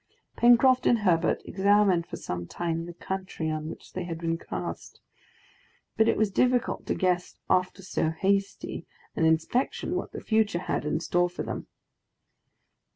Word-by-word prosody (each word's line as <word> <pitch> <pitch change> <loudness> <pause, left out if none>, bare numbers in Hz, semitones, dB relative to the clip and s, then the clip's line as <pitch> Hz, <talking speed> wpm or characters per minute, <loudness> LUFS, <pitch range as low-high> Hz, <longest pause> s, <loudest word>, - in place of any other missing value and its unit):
Pencroft 245 +2 +5
and 240 - +5
Herbert 175 -4 +2
examined 195 -3 +3
for - - -6
some 85 -1 -5
time 165 - -3
the 175 - -8
country 185 -4 -4
on 155 0 -3
which - - -11
they 185 - -3
had 165 -2 -4
been 165 0 -1
cast; 165 - -6 1.0
but 220 0 +4
it - - +2
was 215 -1 +2
difficult 250 +4 +1
to - - 0
guess 180 -1 0 0.2
after 185 +1 +1
so 170 -3 0
hasty 195 +4 -1 0.3
an 165 - +2
inspection 160 +11 +1
what - - -3
the - - -6
future 220 -5 +1
had - - -2
in 150 - 0
store 175 +2 +1
for 175 - -5
them. - - -5
180 Hz, 160 wpm, -27 LUFS, 165-205 Hz, 1.0 s, Pencroft